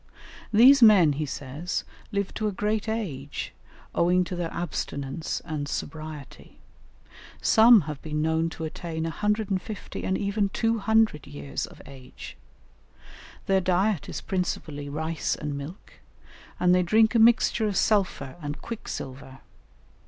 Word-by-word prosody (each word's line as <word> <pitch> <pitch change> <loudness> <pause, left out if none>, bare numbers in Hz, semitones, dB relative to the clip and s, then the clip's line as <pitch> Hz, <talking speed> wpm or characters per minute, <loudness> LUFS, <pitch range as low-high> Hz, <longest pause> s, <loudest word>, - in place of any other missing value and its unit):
These 255 +5 +7
men, 195 -9 +7
he 150 +1 -3
says, 145 +6 -4 0.3
live 200 -2 -2
to 215 - -1
a - - 0
great 210 +2 -1
age, 150 -12 -4 0.4
owing 180 +2 +3
to 180 - -5
their 175 -2 -3
abstinence 150 -3 -4
and 150 -3 -4
sobriety; 155 -3 -7 0.8
some 225 -1 +7
have 150 -2 -6
been 150 -1 -3
known 160 +1 +1
to 160 - -8
attain 160 0 -4
150 210 +3 -2
and 190 - 0
even 200 0 0
200 220 -5 +1
years 145 0 -5
of - - -15
age; 130 -2 -11 1.1
their 195 -1 +2
diet 185 -1 +1
is - - -5
principally 155 -6 -3
rice 160 +2 -2
and 150 -2 -4
milk, 145 +7 -9 0.7
and 180 0 +4
they 180 - +4
drink 220 +6 +4
a 235 - +3
mixture 225 -1 +4
of 200 -3 -1
sulphur 190 -9 +1
and 145 0 -5
quicksilver. 135 - -7
175 Hz, 130 wpm, -26 LUFS, 150-210 Hz, 1.1 s, These